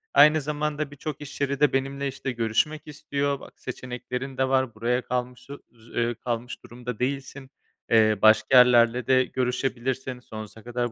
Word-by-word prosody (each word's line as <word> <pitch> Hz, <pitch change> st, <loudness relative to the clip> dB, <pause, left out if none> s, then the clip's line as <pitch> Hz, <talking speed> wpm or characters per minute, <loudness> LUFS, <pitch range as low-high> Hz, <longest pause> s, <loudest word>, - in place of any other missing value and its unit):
Aynı 150 Hz, +1 st, +7 dB
zamanda 150 Hz, 0 st, -2 dB
birçok 145 Hz, 0 st, -6 dB
iş 145 Hz, 0 st, -9 dB
yeri 140 Hz, -1 st, 0 dB
de 150 Hz, -3 st, +3 dB
benimle, 135 Hz, +1 st, -1 dB
işte, 135 Hz, 0 st, -4 dB
görüşmek 125 Hz, +7 st, -1 dB
istiyor, 140 Hz, -1 st, -2 dB
bak -, -, -15 dB
seçeneklerin 130 Hz, +1 st, -6 dB
de 130 Hz, 0 st, +2 dB
var, 130 Hz, -4 st, +1 dB
buraya 120 Hz, +3 st, 0 dB
kalmışı 125 Hz, +2 st, -5 dB
j 115 Hz, -1 st, -20 dB
eee, 120 Hz, 0 st, 0 dB
kalmış 120 Hz, +1 st, -5 dB
durumda 120 Hz, -1 st, -7 dB
değilsin. 135 Hz, +1 st, -3 dB, 0.4 s
Eee, 110 Hz, -2 st, +5 dB
başka 110 Hz, +3 st, +6 dB
yerlerle 120 Hz, -1 st, +5 dB
de 130 Hz, -1 st, +5 dB
görüşebilirsin, 130 Hz, 0 st, -2 dB
sonsuza 110 Hz, -2 st, -10 dB
kadar 120 Hz, 0 st, -2 dB
130 Hz, 155 wpm, -25 LUFS, 120-140 Hz, 0.4 s, Aynı